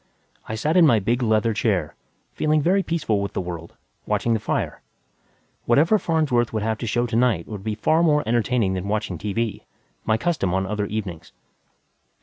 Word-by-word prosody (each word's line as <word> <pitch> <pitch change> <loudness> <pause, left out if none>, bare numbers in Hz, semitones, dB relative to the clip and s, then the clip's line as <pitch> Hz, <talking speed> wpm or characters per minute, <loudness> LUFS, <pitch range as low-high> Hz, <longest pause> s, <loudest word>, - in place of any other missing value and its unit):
I 110 - -2
sat 150 +9 0
in 170 -3 +7
my 115 - +5
big 120 +5 0
leather 110 -1 +2
chair, 100 -8 0 0.4
feeling 155 0 +1
very 185 +6 +2
peaceful 155 - -1
with 100 - -4
the - - -2
world, 85 -2 -6 0.3
watching 115 - +1
the 110 - +1
fire. - - -2 0.8
Whatever 160 - +4
Farnsworth 150 -10 +1
would 110 -2 -2
have 110 0 -1
to 120 - -4
show 120 +3 +1
to 115 -1 -3
night 125 0 +2
would 105 -3 -7
be 110 0 -2
far 155 +9 +2
more 150 -3 +3
entertaining 115 -3 +1
than 95 +1 -3
watching 105 -5 -2
T.V. 105 +2 -2 0.4
my 110 - +1
custom 110 - 0
on 95 0 0
other 105 +1 -2
evenings. 95 -7 -6
110 Hz, 180 wpm, -23 LUFS, 100-125 Hz, 0.8 s, in